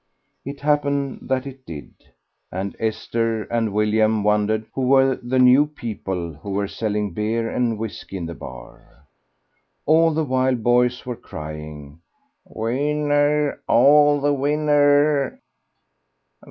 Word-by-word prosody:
It 140 +1 -8
happened 140 -2 -1
that 130 0 0
it 135 -1 -10
did, 75 - -9 0.6
and 95 +2 -4
Esther 115 0 -1
and 115 -2 -1
William 105 +1 +1
wondered 105 +1 +1
who 135 - -3
were 135 0 +4
the 125 +1 -3
new 130 +3 +6
people 95 - -5
who 75 +7 -11
were 100 +1 -1
selling 105 -2 -3
beer 110 +3 -1
and 115 -2 -1
whisky 105 -3 -6
in 85 - -5
the 85 - -6
bar? 65 +2 -13 0.8
All 165 +2 +4
the 160 +1 0
while 130 -1 +1
boys 120 +1 +1
were 125 -1 -4
crying, 75 -3 -9 0.4
"Win 145 +7 -2
ner, 145 0 +1
all 145 +3 +5
the 145 +1 +1
win 145 +2 -1
ner!" 145 - +3
120 Hz, 130 wpm, -22 LUFS, 105-145 Hz, 0.8 s, new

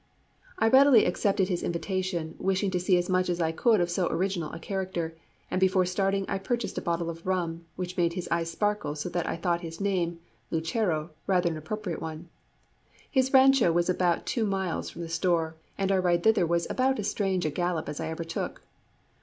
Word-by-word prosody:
I 225 - +3
readily 265 -1 +7
accepted 195 +1 +1
his 180 -3 -1
invitation, 175 -2 -2
wishing 190 +1 0
to 180 - 0
see 180 +1 +3
as 175 0 0
much 185 -1 +1
as 175 0 -1
I 160 -1 +1
could 220 +6 +3
of 175 0 0
so 175 0 +1
original 180 -4 -1
a - - -6
character, 180 -3 -3 0.4
and 185 - 0
before 185 -1 +4
starting 195 +2 0
I 195 - -2
purchased 235 +4 -2
a - - -9
bottle 170 0 -1
of 165 0 -6
rum, 170 -3 -1
which 180 0 -5
made 170 -1 +2
his 180 -1 -4
eyes 170 -1 0
sparkle 205 -4 -1
so 150 +4 -4
that 175 -1 -2
I - - -1
thought 170 0 0
his 165 -1 -7
name 180 -4 0 0.3
Lucero 165 -1 -1 0.2
rather 180 -3 +2
an 160 - -4
appropriate 175 +3 -4
one. 160 +2 -6 0.8
His 260 -1 +2
rancho 265 -7 +6
was 175 +2 +2
about 175 -1 +1
two 225 -3 0
miles 190 -3 -2
from 170 - -7
the - - -5
store, 165 -1 0 0.2
and 195 0 0
our 190 -1 +3
ride 175 -1 +2
thither 215 -6 +4
was 170 0 +1
about 265 +1 +1
as 205 - -2
strange 190 -4 0
a 155 - 0
gallop 175 0 -1
as 150 0 -5
I 160 - -3
ever 160 +1 -4
took. 165 0 -5
180 Hz, 205 wpm, -28 LUFS, 170-195 Hz, 0.8 s, readily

